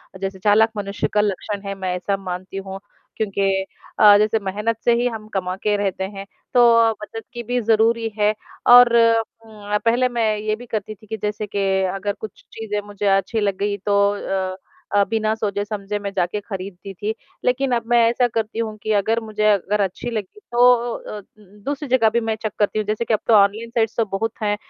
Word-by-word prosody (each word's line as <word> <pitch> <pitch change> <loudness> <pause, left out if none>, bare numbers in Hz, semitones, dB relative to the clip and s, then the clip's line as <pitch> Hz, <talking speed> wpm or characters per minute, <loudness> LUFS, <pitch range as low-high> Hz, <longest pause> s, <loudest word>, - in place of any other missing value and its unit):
अ, - - -7
जैसे 195 -1 -4
चालाक 215 +3 +4
मनुष्य 200 0 -2
का 210 - +4
लक्षण 205 0 -2
है 195 - -2
मैं 190 -2 -3
ऐसा 195 +2 -1
मानती 185 0 -6
हूँ, 195 0 -6 0.4
क्योंकि 195 -2 0 0.3
अ, 205 -1 +8
जैसे 215 +1 +2
मेहनत 210 +3 -2
से 240 - +5
ही 245 - +2
हम 220 -3 -6
कमा 185 -1 -2
के 210 -1 +2
रहते 195 -2 -2
हैं, 195 0 -6 0.3
तो 230 -2 +6
बचत 225 +1 -7
की 240 -1 -5
भी 245 +2 -1
ज़रूरी 225 +1 +2
है। 210 0 +3 0.4
और 245 -1 +8
उम, 225 -2 0
अ, - - +4
पहले 245 +2 +3
मैं 225 -3 +1
ये 215 0 -1
भी 245 +3 -11
करती 215 -2 -4
थी 215 +1 -20
कि 220 - -4
जैसे 210 0 -2
के 195 -1 +1 0.3
अगर 200 +1 -2
कुछ 215 -3 -9
चीज़ें 210 -2 -4
मुझे 205 0 -3
अच्छी 210 +4 -2
लग 200 -2 0
गई 200 +1 -1
तो 200 -1 +3 0.5
अ - - -7 0.4
अ, 200 - +5
बिना 220 -1 +1
सोचे-समझे 205 -1 -3
मैं 200 -1 -4
जाके 185 +2 -1
खरीदती 195 -1 -7
थी। 210 +4 -3 0.3
लेकिन 260 +1 +1
अब 235 - -1
मैं 240 - +4
ऐसा 245 +1 +2
करती 225 -1 -3
हूँ 220 -2 -2
कि 220 - -1
अगर 215 +3 +1
मुझे, 215 -2 -4
अगर 205 +1 +1
अच्छी 195 +5 -2
लगी 215 - -5
तो 240 - -1
ओ, 245 -1 +4
अ, 215 - -8
उम, - - -14 0.4
दूसरी 285 +1 -3
जगह 245 -3 +4
भी 235 +2 +1
मैं 225 -1 -1
चेक 215 - -2
करती 210 +1 +1
हूँ। 215 - -2
जैसे 215 +2 -1
कि 230 - 0
अब 215 - +2
तो 230 - +4
ऑनलाइन 210 +2 +3
साइट्स 230 -2 0
तो 230 - +2
बहुत 215 +3 -2
हैं, 205 0 +1
215 Hz, 215 wpm, -21 LUFS, 200-230 Hz, 0.5 s, अ